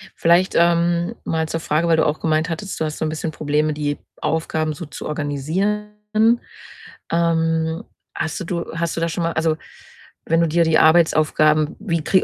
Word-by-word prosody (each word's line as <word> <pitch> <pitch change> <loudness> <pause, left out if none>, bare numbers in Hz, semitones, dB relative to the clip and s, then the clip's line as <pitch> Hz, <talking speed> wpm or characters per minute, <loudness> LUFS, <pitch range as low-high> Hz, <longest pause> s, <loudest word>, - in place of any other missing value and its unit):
Vielleicht, 170 +3 +3
ähm, 170 0 +2
mal 160 -1 -1
zur 165 - -2
Frage, 160 +1 0
weil 165 -1 +4
du 160 - +3
auch 150 0 0
gemeint 160 +1 0
hattest, 170 +4 -5
du 160 - 0
hast 155 0 -4
so - - -1
'n - - -1
bisschen 155 +1 -3
Probleme, 150 0 0
die 145 -1 -2 0.2
Aufgaben 160 -1 -1
so 160 +4 -7
zu 145 - -9
organisieren. 155 +9 -2 1.2
Ähm, 165 -1 +1 0.3
hast 160 0 -3
du 185 - -5
du 170 0 -3
hast 165 0 -2
du 165 - -3
da 165 - 0
schon 170 +1 -2
mal 165 0 -1
also, 160 0 +1 0.7
wenn 165 +1 +2
du 170 - +3
dir 170 +2 +3
die 160 -1 +3
Arbeitsaufgaben 155 -1 +3
wie 170 -6 -1
krei 190 +4 +3
160 Hz, 185 wpm, -21 LUFS, 155-170 Hz, 1.2 s, weil